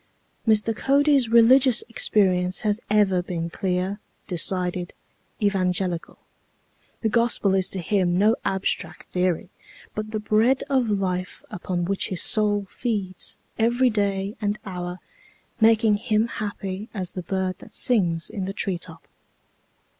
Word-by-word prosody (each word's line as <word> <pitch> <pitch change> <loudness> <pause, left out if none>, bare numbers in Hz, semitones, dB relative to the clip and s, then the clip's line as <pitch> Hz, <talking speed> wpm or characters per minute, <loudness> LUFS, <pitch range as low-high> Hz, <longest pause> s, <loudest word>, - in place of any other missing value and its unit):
Mr. 220 0 +3
Cody's 280 -1 +3
religious 240 +2 +6
experience 185 -6 +2
has 210 0 0
ever 200 -3 +3
been 170 -2 -4
clear, 185 +3 -2 0.3
decided, 180 0 -1 0.4
evangelical. 185 -3 -1 0.8
The 220 - +1
Gospel 230 -3 +2
is 190 -1 +2
to 190 - -3
him 180 -1 +1
no 215 +4 +4
abstract 190 0 -2
theory, 180 0 0 0.4
but 215 0 -4
the 215 0 -3
bread 220 +5 +2
of 255 -4 +2
life 185 -3 -2
upon 175 -1 -3
which 195 +2 0
his 185 - 0
soul 205 -2 +2
feeds 200 -5 -3 0.2
every 240 +3 +3
day 200 -1 -1
and 205 0 -1
hour, 180 -2 -5 0.6
making 220 -1 +4
him 215 0 +1
happy 205 -2 -5
as 185 -3 +1
the 185 - -5
bird 185 +1 -2
that - - -12
sings 175 -9 +1
in 195 -3 -4
the 195 - -4
tree 190 -3 -1
top. 165 -2 -11
200 Hz, 130 wpm, -24 LUFS, 185-220 Hz, 0.8 s, religious